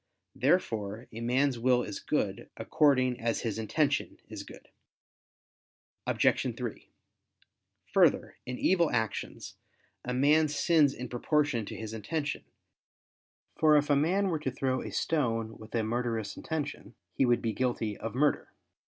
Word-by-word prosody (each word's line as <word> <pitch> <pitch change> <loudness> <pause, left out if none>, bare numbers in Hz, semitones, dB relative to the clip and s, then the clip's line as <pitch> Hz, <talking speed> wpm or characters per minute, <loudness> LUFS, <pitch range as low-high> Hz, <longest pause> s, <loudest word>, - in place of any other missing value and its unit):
Therefore 115 - 0
a 115 - -7
man's 125 +2 +1
will 125 0 +3
is 105 -3 -5
good, - - -2
according 130 -4 +2
as 115 0 0
his 110 -2 -3
intention 145 +7 0
is - - -6
good. - - -13 1.4
Obj. - - +2
3: - - -6 1.1
Further, - - +3
in 125 0 -4
evil 170 -4 +3
actions, 110 -2 -3 0.5
a 125 - -4
man 145 +5 +4
sins 150 -1 +3
in 125 - -6
proportion 125 -1 0
to - - -6
his 110 0 -6
intention: 145 +8 -3 1.1
for 155 -1 +6
if 145 0 +1
a - - +5
man 185 +7 +2
were 160 -3 -1
to 150 - -2
throw 130 0 -1
a - - -6
stone 115 -8 -1
with 110 +2 -9
a 115 - +1
murderous 115 -2 -2
intention, 160 -3 -5 0.2
he - - +1
would 120 -2 +2
be 115 -1 0
guilty 120 -4 -1
of 115 +2 -6
murder. 145 +2 +1
125 Hz, 145 wpm, -30 LUFS, 115-150 Hz, 1.4 s, for